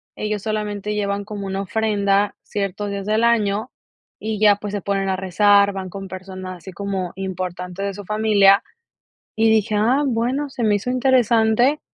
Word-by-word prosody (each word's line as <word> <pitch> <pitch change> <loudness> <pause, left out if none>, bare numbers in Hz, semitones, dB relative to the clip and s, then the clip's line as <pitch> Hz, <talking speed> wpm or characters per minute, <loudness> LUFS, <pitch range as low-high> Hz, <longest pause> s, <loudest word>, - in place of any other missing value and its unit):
ellos 210 -1 -3
solamente 210 -1 -3
llevan 200 -1 -1
como 205 -1 -6
una 195 +1 -2
ofrenda 205 -1 +1
ciertos 205 0 -3
días 200 -1 -4
del 215 +2 +1
año 220 0 +1 0.5
y 215 -1 -3
ya, 210 -1 +6
pues, 205 0 -6
se 205 - -2
ponen 195 0 -1
a 190 - 0
rezar, 200 +2 +4
van 190 -1 -5
con 195 +1 -7
personas 185 0 -7
así 185 +3 -11
como 190 -1 -3
importantes 185 0 -5
de 200 - -2
su 205 0 -9
familia, 210 -1 +4 0.7
y 220 0 +3
dije, 215 -1 +2
ah, 250 +7 +2
bueno, 255 +4 -1
se 255 -3 -4
me 210 -2 +3
hizo 205 +5 -3
interesante 250 +1 +3
205 Hz, 170 wpm, -21 LUFS, 195-220 Hz, 0.7 s, ya